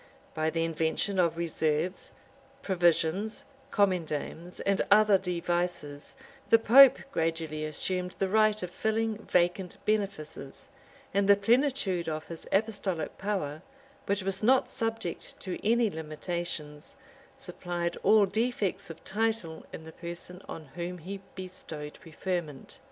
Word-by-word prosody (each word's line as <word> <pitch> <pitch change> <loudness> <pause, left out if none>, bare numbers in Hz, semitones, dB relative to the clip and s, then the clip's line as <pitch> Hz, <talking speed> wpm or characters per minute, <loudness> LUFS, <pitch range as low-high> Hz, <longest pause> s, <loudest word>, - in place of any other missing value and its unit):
By 155 0 0
the 165 +1 0
invention 165 +4 -1
of 170 -2 +2
reserves, 165 +1 -1 0.5
provisions, 175 +3 +1 0.2
commendams, 175 - -1
and 200 -1 +2
other 210 -1 +6
devices, 175 -5 -2 0.3
the 230 - +8
pope 255 +4 +8
gradually 160 - -1
assumed 180 +4 -2
the 195 - +1
right 215 0 +3
of 180 - -4
filling 220 +1 -1
vacant 180 -2 +1
benefices; 195 -10 -2 0.5
and 200 0 +2
the 200 - +9
plenitude 215 - +2
of 155 0 -4
his 165 -1 -9
apostolic 195 -6 -1
power, 185 -7 -2 0.5
which 200 -1 0
was 195 0 -1
not 255 +4 +4
subject 225 -6 -3
to 185 -2 -5
any 230 0 +3
limitations, 155 -1 -5 0.4
supplied 175 -9 -3
all 215 -2 +6
defects 215 -1 -1
of 165 - -10
title 215 -6 -2
in 160 - -8
the 160 - -10
person 175 +1 -7
on 160 - -7
whom 175 +1 -4
he 190 +4 -7
bestowed 160 -5 -7
preferment. 165 -3 -5
180 Hz, 125 wpm, -29 LUFS, 165-205 Hz, 0.5 s, the